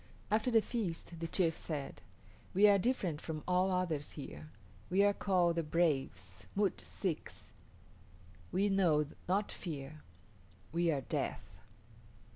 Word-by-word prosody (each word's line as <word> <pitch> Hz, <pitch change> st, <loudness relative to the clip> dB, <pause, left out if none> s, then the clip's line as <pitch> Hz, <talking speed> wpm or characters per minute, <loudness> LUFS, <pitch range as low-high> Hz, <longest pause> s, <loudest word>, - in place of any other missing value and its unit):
After 215 Hz, +3 st, +3 dB
the 225 Hz, -3 st, +4 dB
feast 175 Hz, -7 st, -3 dB
the 165 Hz, -, -2 dB
chief 165 Hz, -2 st, +1 dB
said, 145 Hz, -4 st, -5 dB, 0.5 s
"We 205 Hz, +2 st, +7 dB
are 200 Hz, -1 st, +6 dB
different 185 Hz, -, 0 dB
from 155 Hz, -2 st, -5 dB
all 180 Hz, +1 st, +3 dB
others 175 Hz, -6 st, -1 dB
here. 75 Hz, -, -8 dB, 0.4 s
We 195 Hz, +2 st, +4 dB
are 205 Hz, 0 st, +5 dB
called 180 Hz, -4 st, +2 dB
the -, -, +3 dB
Braves 135 Hz, -, -1 dB
(M[)u]t´ 205 Hz, -1 st, +1 dB
s[)i]ks). 180 Hz, -6 st, -4 dB, 1.0 s
We 195 Hz, +2 st, +2 dB
know 175 Hz, -7 st, +3 dB, 0.2 s
not 200 Hz, +3 st, +1 dB
fear; 150 Hz, -2 st, -6 dB, 0.7 s
we 170 Hz, +1 st, +2 dB
are 145 Hz, -4 st, +1 dB
death. -, -, -3 dB
170 Hz, 130 wpm, -34 LUFS, 150-195 Hz, 1.0 s, We